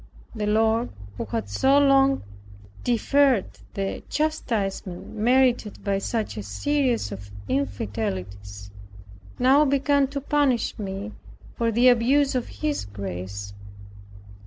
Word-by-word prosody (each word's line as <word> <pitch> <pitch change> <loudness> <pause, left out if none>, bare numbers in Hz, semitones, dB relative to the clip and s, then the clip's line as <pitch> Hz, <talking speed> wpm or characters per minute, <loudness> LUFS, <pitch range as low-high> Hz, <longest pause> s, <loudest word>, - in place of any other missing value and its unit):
The 215 -3 -3
Lord, 220 +2 +2 0.3
who - - -2
had 105 0 -3
so 265 - +3
long 275 -1 +4 0.6
deferred 250 -1 +3 0.3
the 195 -1 -3
chastisement 215 - -2
merited 245 -1 +2
by 200 -1 0
such 220 - -3
a - - -3
series 245 - 0
of 100 +1 -8 0.2
infidelities, 100 -4 -4 0.7
now 265 +4 +5
began 280 0 +2
to 280 +1 -4
punish 280 -5 +1
me 200 +1 -5 0.4
for 230 -1 0
the 240 +3 +4
abuse 255 +4 +4
of 250 -2 -1
his 305 -1 -3
grace. 100 0 -6
225 Hz, 110 wpm, -24 LUFS, -, 0.7 s, now